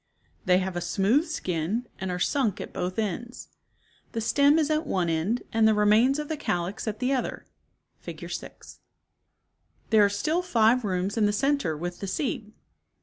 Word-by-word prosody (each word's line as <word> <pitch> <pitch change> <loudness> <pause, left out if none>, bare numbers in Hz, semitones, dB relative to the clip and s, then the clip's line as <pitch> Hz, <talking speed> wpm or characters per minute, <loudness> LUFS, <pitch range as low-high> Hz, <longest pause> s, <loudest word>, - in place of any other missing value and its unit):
30 - - -40 0.2
They 180 0 +5
have 185 -1 -2
a 175 - -2
smooth 210 - +2
skin, 190 - -2
and 190 - -3
are 180 - -2
sunk 220 +1 0
at - - -7
both 180 +1 -3
ends. 225 +3 -4 0.6
The 230 - -2
stem 285 +6 +4
is 310 -1 +1
at 310 +1 0
one 180 -3 0
end 170 +9 0
and 220 0 +4
the 220 - +4
remains 215 +6 +4
of 300 0 -4
the 315 - -3
calyx 180 -6 -3
at 215 -1 -2
the 255 +3 0
other 255 - -3 0.5
(Fig. - - -8
6). - - -8 1.1
There 215 -2 +6
are 200 - +4
still 305 - 0
five 235 -6 +3
rooms 190 +1 -1
in 210 -2 +3
the - - +2
center 235 - 0
with 175 +2 -5
the 200 - -5
seed. 215 0 -3
215 Hz, 185 wpm, -26 LUFS, 185-260 Hz, 1.1 s, There